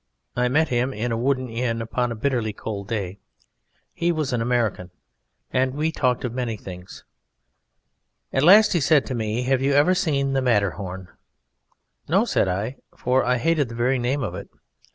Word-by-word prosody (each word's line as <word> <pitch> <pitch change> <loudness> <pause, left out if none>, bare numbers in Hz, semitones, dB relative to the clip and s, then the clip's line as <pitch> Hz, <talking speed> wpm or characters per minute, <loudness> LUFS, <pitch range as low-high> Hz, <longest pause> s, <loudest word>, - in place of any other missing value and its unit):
I 125 0 +2
met 155 +5 +2
him 125 +1 0
in 115 +3 -2
a - - 0
wooden 130 +2 0
inn 115 0 -2
upon 120 +2 -2
a - - -3
bitterly 115 -3 -1
cold 100 -2 -6
day. 100 -3 -4 0.7
He 170 +1 0
was 155 -5 -2
an 120 - 0
American, 115 -6 0 0.6
and 130 0 +1
we 155 +2 0
talked 125 -5 0
of 120 - -3
many 120 -3 -3
things. 90 -2 -10 1.3
At 135 - +2
last 205 +8 +7
he 175 - +2
said 150 -1 +3
to 130 - -4
me: 110 0 -2
"Have 130 0 +1
you 140 +1 +2
ever 145 +6 +4
seen 140 -7 0
the 135 - +1
Matterhorn?" 95 -6 -1 1.0
"No," - - +3
said - - +1
I; 105 +8 -2 0.2
for 130 +1 +1
I 125 0 +1
hated 145 0 +1
the 115 - -8
very 125 +2 +1
name 130 +3 -1
of - - -3
it. - - -8
125 Hz, 180 wpm, -23 LUFS, 115-140 Hz, 1.3 s, last